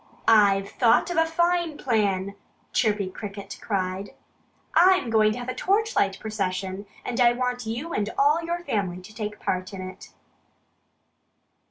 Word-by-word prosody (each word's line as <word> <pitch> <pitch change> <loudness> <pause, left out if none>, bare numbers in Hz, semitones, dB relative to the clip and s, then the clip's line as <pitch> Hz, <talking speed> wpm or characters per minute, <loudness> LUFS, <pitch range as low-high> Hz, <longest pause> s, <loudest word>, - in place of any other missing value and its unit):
"I've 200 -3 +5
thought 240 +8 +3
of 350 - -3
a 325 0 +4
fine 345 -1 +1
plan!" 200 -6 0 0.4
Chirpy 210 -4 +1
Cricket 200 0 -8
cried. 190 -1 -3 0.6
"I'm 360 -7 +5
going 215 -1 +4
to - - -6
have 245 0 -6
a 255 - -2
torchlight 390 - +1
procession 195 -2 -3 0.2
and 245 - -3
I 240 0 +6
want 245 -1 -2
you 250 +10 -4
and 205 0 -1
all 295 +4 +4
your 345 +1 -3
family 190 - -2
to 190 +4 -13
take 210 -1 -5
part 185 +2 -2
in 190 - -6
it." 185 - -11
220 Hz, 150 wpm, -25 LUFS, 195-285 Hz, 0.6 s, I